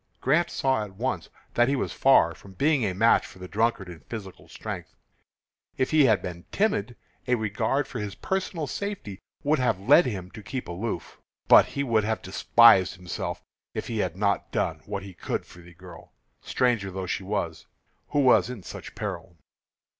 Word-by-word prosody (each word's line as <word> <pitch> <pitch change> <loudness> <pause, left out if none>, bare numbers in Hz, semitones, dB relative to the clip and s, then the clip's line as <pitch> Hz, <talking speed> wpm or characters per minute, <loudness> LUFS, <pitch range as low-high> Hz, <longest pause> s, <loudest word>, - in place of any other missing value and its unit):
Grant 170 +6 +2
saw 130 -5 0
at 100 -2 -10
once 110 -7 -3 0.2
that 120 0 +4
he 140 - +2
was 130 - -2
far 110 -11 +5
from 95 +2 -15
being 140 - +2
a 95 -4 -1
match 115 +4 +4
for - - -12
the 90 0 -8
drunkard 110 -1 0
in 85 -2 -9
physical 100 -5 -9
strength. - - -7 0.8
If 130 - 0
he 155 -3 +6
had 110 -5 +3
been 85 -1 -7
timid, 125 - 0 0.3
a 125 - +3
regard 110 +6 -1
for 125 - -6
his 105 -2 -5
personal 190 -4 -2
safety 180 - -5 0.2
would 150 0 +2
have 125 -7 +1
led 135 - +5
him 95 -6 -5
to 110 - -10
keep 130 +5 -5
aloof. 90 +1 -5 0.3
But - - +8
he 140 - -3
would 115 -5 +2
have 110 +1 -2
despised 95 0 +5
himself 90 -1 -5 0.3
if - - -3
he 115 -2 -3
had 90 -3 -1
not 100 -1 0
done - - -1
what 100 -1 -4
he 95 -1 -9
could 85 - -4
for - - -15
the 85 0 -16
girl 90 0 -13 0.3
stranger 120 -6 0
though 95 0 -5
she 90 - -2
was 95 -5 -3 0.4
who 145 - +1
was 130 -2 +5
in 120 -7 -7
such - - -9
peril. 85 - -6
110 Hz, 185 wpm, -26 LUFS, 95-130 Hz, 0.8 s, But